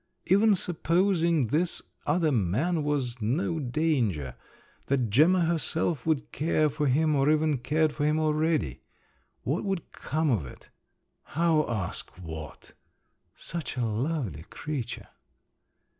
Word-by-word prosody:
Even 205 +3 +5
supposing 170 - +1
this 165 +6 +1 0.3
"other 165 -3 +2
man" 130 - +1
was 130 -5 -1
no 155 - 0
danger, 120 - 0 0.5
that 130 -6 +1
Gemma 165 - +5
herself 160 -3 -1
would 155 -4 0
care 155 -1 +1
for 150 +1 -1
him, 155 +4 +3
or 140 +1 +3
even 155 -2 +2
cared 150 +5 +1
for 145 +1 -3
him 150 +1 +2
already… 155 - 0 0.6
What 145 +7 -1
would 195 -4 -3
come 155 +1 -1
of 105 -10 +1
it? 65 - -12 0.7
How 165 -4 +3
ask 105 -7 -2
what! 80 -3 -9 0.6
Such 165 -5 -5
a 120 - +1
lovely 115 - -2
creature! 135 - -6
150 Hz, 125 wpm, -28 LUFS, 120-165 Hz, 0.7 s, Even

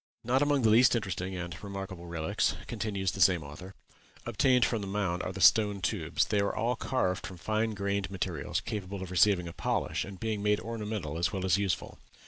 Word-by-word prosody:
"Not 125 +4 +2
among 145 -3 +2
the 110 - +5
least 120 +3 +6
interesting 95 -4 -3
and 85 -1 -6
remarkable 95 -3 -6
relics," 85 -2 0
continues 100 -3 -2
the 95 - -5
same 90 -3 +5
author, 85 +7 -10 0.5
"obtained 125 +2 +3
from 115 -3 -1
the 100 - -5
mounds 95 -3 -1
are - - -3
the 95 - -7
stone 105 +2 +5
tubes. 85 -4 0
They 105 - 0
are 100 - 0
all 115 +3 0
carved 95 -7 -1
from 95 - -9
fine 110 +3 -1
grained 100 -1 -1
materials, 90 -6 -3
capable 100 -2 -5
of 95 - -8
receiving 90 -1 +3
a 85 - -7
polish, - - -1
and 95 -2 -9
being 110 -2 -2
made 105 0 +2
ornamental 105 -8 -4
as 85 0 +1
well 95 -1 -3
as 95 +1 +3
useful. 100 -2 -2
100 Hz, 200 wpm, -30 LUFS, 90-110 Hz, 0.5 s, least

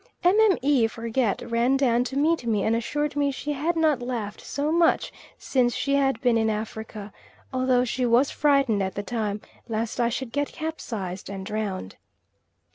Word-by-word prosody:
Mme. 350 - +4
Forget 230 0 -1
ran 240 +3 +2
down 245 -3 +2
to 270 - -4
meet 305 -3 +1
me 210 -3 +1
and 225 - +2
assured 295 +6 -2
me 285 -1 +2
she 290 +2 -3
had 310 +5 -1
not 310 -5 +2
laughed 235 -5 -4
so 290 +2 -2
much 335 0 +2 0.2
since 245 -3 +1
she 275 - -1
had 275 -1 +2
been 240 -2 +3
in 220 0 +2
Africa, 215 -1 -5 0.4
although 255 -1 +2
she 250 0 -1
was 240 +4 +3
frightened 275 -8 +2
at 190 0 -2
the 205 - -3
time 215 -2 -2 0.3
lest 225 +2 -2
I 235 -1 +3
should 245 0 -4
get 285 +2 0
capsized 220 - -5
and 195 -1 -6
drowned. 200 - -4
245 Hz, 170 wpm, -25 LUFS, 220-285 Hz, 0.4 s, Mme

